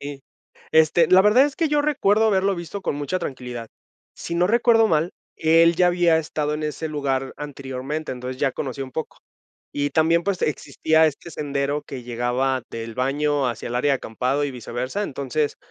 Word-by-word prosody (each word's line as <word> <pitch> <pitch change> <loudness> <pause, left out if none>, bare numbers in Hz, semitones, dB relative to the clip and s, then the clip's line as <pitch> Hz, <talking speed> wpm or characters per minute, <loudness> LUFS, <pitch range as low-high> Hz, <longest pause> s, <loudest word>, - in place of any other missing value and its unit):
sí. 140 -1 -7 0.5
Este, 160 +1 +4
la 185 +1 +7
verdad 225 +7 +5
es 290 - -6
que 325 -3 +1
yo 295 0 +2
recuerdo 225 -8 +2
haberlo 195 -2 +2
visto 175 +3 -6
con - - -1
mucha 145 +6 -2
tranquilidad. 125 -6 -6 0.5
Si 170 - -6
no 175 +1 +3
recuerdo 225 +1 +4
mal, 160 -1 +1 0.2
él 165 +1 +4
ya 180 0 +4
había 175 -2 +3
estado 150 -1 -2
en 155 - -4
ese 155 +1 -3
lugar 135 -3 -2
anteriormente, 140 +1 -5
entonces, 125 +1 -6
ya 135 -2 +2
conocía 135 0 -4
un 130 - -12
poco. 160 - -5 0.5
Y 145 0 -1
también, 165 +1 +3
pues, 200 -2 -1
existía 155 +2 +2
este 155 +3 -4
sendero 145 0 -2
que 135 -3 -8
llegaba 125 +2 -1
del 115 0 -6
baño 140 +2 0
hacia 120 -1 -4
el 120 - -5
área 140 +3 +2
de - - +3
acampado, 130 +5 -2
y 145 - -2
viceversa. 125 - -4
Entonces, 145 -2 -2
150 Hz, 185 wpm, -23 LUFS, 130-170 Hz, 0.5 s, la